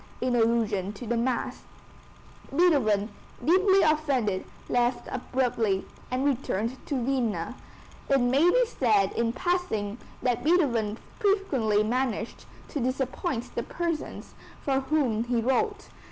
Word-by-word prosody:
in 250 Hz, 0 st, 0 dB
allusion 225 Hz, -4 st, +1 dB
to 210 Hz, +4 st, -9 dB
the 235 Hz, +1 st, 0 dB
mass. 240 Hz, +1 st, -1 dB, 0.9 s
Beethoven, 270 Hz, -, +3 dB, 0.4 s
deeply 380 Hz, +4 st, +5 dB
offended, 275 Hz, -11 st, +1 dB, 0.2 s
left 245 Hz, 0 st, +1 dB
abruptly, 235 Hz, -6 st, 0 dB, 0.2 s
and 255 Hz, +2 st, -1 dB
returned 255 Hz, -3 st, -1 dB
to 260 Hz, -5 st, -1 dB
Vienna. 250 Hz, -5 st, -1 dB, 0.6 s
It 275 Hz, -1 st, +4 dB
may 265 Hz, +7 st, +4 dB
be -, -, +4 dB
said 215 Hz, -, +2 dB
in 230 Hz, 0 st, 0 dB
passing 245 Hz, -, -1 dB, 0.2 s
that 245 Hz, -2 st, 0 dB
Beethoven 240 Hz, -, +2 dB, 0.2 s
frequently 280 Hz, -, +2 dB
managed 235 Hz, -1 st, -2 dB, 0.2 s
to 290 Hz, -, -3 dB
disappoint 255 Hz, -, -2 dB
the -, -, -1 dB
persons 335 Hz, +4 st, -4 dB, 0.3 s
for 270 Hz, -1 st, +1 dB
whom 265 Hz, -6 st, 0 dB
he 245 Hz, 0 st, -1 dB
wrote. 410 Hz, -, 0 dB
250 Hz, 120 wpm, -27 LUFS, 225-300 Hz, 0.9 s, deeply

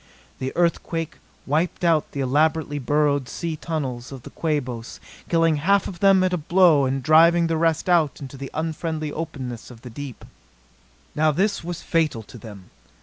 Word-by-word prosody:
The 130 Hz, 0 st, -3 dB
earthquake 165 Hz, -1 st, -1 dB, 0.3 s
wiped 160 Hz, +6 st, -1 dB
out 165 Hz, -3 st, +2 dB
the 140 Hz, -, -3 dB
elaborately 145 Hz, +2 st, +1 dB
burrowed 145 Hz, 0 st, +1 dB
sea 165 Hz, -2 st, -4 dB
tunnels 135 Hz, -7 st, -4 dB
of 130 Hz, -3 st, -9 dB
the -, -, -10 dB
Quabos, 130 Hz, -7 st, -3 dB, 0.3 s
killing 165 Hz, -2 st, +3 dB
half 195 Hz, +7 st, +2 dB
of 175 Hz, -, -8 dB
them 195 Hz, -1 st, +5 dB
at 185 Hz, -1 st, +1 dB
a -, -, +1 dB
blow 165 Hz, -3 st, +4 dB
and 135 Hz, 0 st, -1 dB
driving 165 Hz, +3 st, +5 dB
the 165 Hz, 0 st, 0 dB
rest 165 Hz, 0 st, +1 dB
out 170 Hz, -5 st, +2 dB
into 135 Hz, -1 st, -9 dB
the 135 Hz, 0 st, -7 dB
unfriendly 160 Hz, -1 st, -3 dB
openness 135 Hz, -7 st, -6 dB
of 120 Hz, -2 st, -14 dB
the 125 Hz, -, -9 dB
deep. 135 Hz, 0 st, -8 dB, 0.9 s
Now 155 Hz, +1 st, +2 dB
this 195 Hz, +6 st, 0 dB
was 175 Hz, 0 st, -6 dB
fatal 155 Hz, -9 st, 0 dB
to 120 Hz, -, -13 dB
them. 100 Hz, -3 st, -12 dB
155 Hz, 170 wpm, -23 LUFS, 135-165 Hz, 0.9 s, them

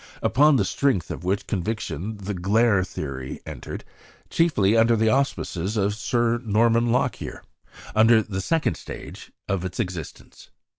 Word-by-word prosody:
Upon 145 Hz, +6 st, +5 dB
the -, -, +2 dB
strength 135 Hz, -, 0 dB
of -, -, -6 dB
which 95 Hz, +3 st, -1 dB
conviction 105 Hz, 0 st, -3 dB
the 100 Hz, +1 st, -5 dB
"glare" 100 Hz, +2 st, +2 dB
theory 65 Hz, -7 st, -6 dB
entered, -, -, -7 dB, 0.5 s
chiefly 115 Hz, -, +3 dB
under 115 Hz, +1 st, +5 dB
the 110 Hz, 0 st, +2 dB
auspices 110 Hz, -6 st, -1 dB
of 100 Hz, 0 st, +1 dB
Sir 120 Hz, +1 st, 0 dB
Norman 115 Hz, +2 st, +3 dB
Lockyer, 125 Hz, -, -1 dB, 0.5 s
upon 110 Hz, +1 st, +5 dB, 0.2 s
the 95 Hz, -2 st, -3 dB
second 155 Hz, -, 0 dB
stage -, -, -9 dB, 0.2 s
of 95 Hz, -3 st, -1 dB
its 95 Hz, +3 st, -5 dB
existence. 90 Hz, -8 st, -6 dB
110 Hz, 140 wpm, -24 LUFS, 95-120 Hz, 0.5 s, Upon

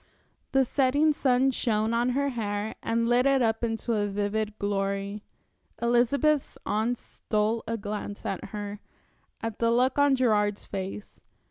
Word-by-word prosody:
The 270 Hz, -1 st, +4 dB
setting 285 Hz, +4 st, +3 dB
sun 265 Hz, -1 st, +2 dB
shone 220 Hz, -2 st, 0 dB
on 240 Hz, +2 st, +2 dB
her 280 Hz, 0 st, +1 dB
hair 210 Hz, -3 st, -3 dB
and 230 Hz, 0 st, 0 dB
lit 245 Hz, +2 st, +4 dB
it 270 Hz, -2 st, +3 dB
up 225 Hz, 0 st, 0 dB
into 230 Hz, +1 st, -1 dB
a 205 Hz, -2 st, +1 dB
vivid 205 Hz, +1 st, -2 dB
glory. 200 Hz, 0 st, -2 dB, 0.6 s
Elizabeth's 255 Hz, +5 st, +2 dB
aunts 225 Hz, +3 st, 0 dB
stole 215 Hz, +1 st, -1 dB
a 230 Hz, +1 st, -1 dB
glance 205 Hz, -1 st, -5 dB
at 190 Hz, -, -3 dB
her, 205 Hz, 0 st, -6 dB, 0.6 s
at 225 Hz, -2 st, -4 dB
the 230 Hz, -, +2 dB
look 255 Hz, +4 st, +2 dB
on 285 Hz, -1 st, +5 dB
Gerard's 210 Hz, -5 st, +1 dB
face. 195 Hz, +1 st, -6 dB
225 Hz, 145 wpm, -27 LUFS, 205-250 Hz, 0.6 s, on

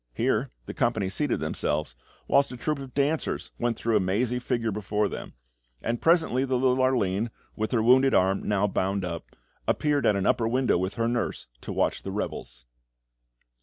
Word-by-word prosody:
Here -, -, +1 dB, 0.2 s
the -, -, -6 dB
company 110 Hz, -5 st, 0 dB
seated 145 Hz, +4 st, 0 dB
themselves, 75 Hz, -3 st, -1 dB, 0.3 s
whilst 140 Hz, -1 st, +3 dB
a 125 Hz, -, -7 dB
troupe 150 Hz, +4 st, -2 dB
of 135 Hz, -2 st, -9 dB
dancers 145 Hz, +3 st, 0 dB
went 120 Hz, -1 st, 0 dB
through 115 Hz, -1 st, 0 dB
a -, -, +5 dB
mazy 110 Hz, +7 st, 0 dB
figure 120 Hz, -3 st, -1 dB
before 105 Hz, +1 st, 0 dB
them; -, -, -7 dB, 0.5 s
and 115 Hz, -, -2 dB
presently 160 Hz, -6 st, +3 dB
the 130 Hz, -1 st, 0 dB
little 130 Hz, 0 st, +2 dB
Arline, 115 Hz, -4 st, +1 dB, 0.3 s
with 110 Hz, 0 st, -2 dB
her 115 Hz, -4 st, +1 dB
wounded 130 Hz, +3 st, +5 dB
arm 95 Hz, +1 st, +3 dB
now 105 Hz, -1 st, +1 dB
bound 95 Hz, -1 st, -1 dB
up, 85 Hz, -2 st, -6 dB, 0.3 s
appeared 145 Hz, -2 st, +2 dB
at 105 Hz, -, +4 dB
an 100 Hz, -, 0 dB
upper 115 Hz, -, +2 dB
window 125 Hz, -4 st, +2 dB
with 95 Hz, +2 st, -2 dB
her 115 Hz, +1 st, 0 dB
nurse, 120 Hz, 0 st, -2 dB, 0.2 s
to -, -, -6 dB
watch -, -, 0 dB
the -, -, -6 dB
revels. -, -, -5 dB
115 Hz, 180 wpm, -27 LUFS, 100-130 Hz, 0.5 s, a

